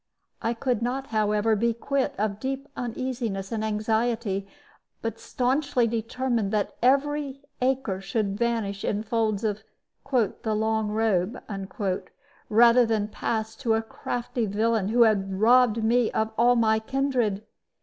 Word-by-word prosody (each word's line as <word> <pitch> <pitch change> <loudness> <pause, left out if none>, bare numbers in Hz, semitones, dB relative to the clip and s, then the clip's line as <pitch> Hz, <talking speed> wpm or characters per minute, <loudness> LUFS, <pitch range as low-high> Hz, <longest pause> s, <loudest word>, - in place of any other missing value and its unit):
I 230 +1 -1
could 245 -1 -1
not, 255 +3 -2
however, 210 +1 +2
be 230 +2 +1
quit 275 +3 -1
of 205 0 -1
deep 270 +3 -3
uneasiness 235 -5 -3
and 220 -1 -2
anxiety, 220 -1 0 0.6
but 225 -1 -3
stanchly 260 0 +1
determined 230 -1 -1
that 210 -1 -1
every 275 +2 +1 0.2
acre 250 -7 0
should 200 0 -1
vanish 220 -3 -1
in 210 +1 -1
folds 220 -2 0
of 215 -1 -1 0.5
"the 220 -3 0
long 220 0 0
robe" 215 0 0 1.1
rather 235 +3 +6
than 220 -2 0
pass 220 0 -2
to 230 -4 +1
a 225 - 0
crafty 240 +1 -3
villain 215 0 +1
who 235 +3 +5
had 195 -3 +1
robbed 230 0 +5
me 235 +1 +3
of 220 0 0
all 240 +2 +4
my 220 -2 +3
kindred. 240 -4 -1
225 Hz, 135 wpm, -26 LUFS, 215-245 Hz, 1.1 s, rather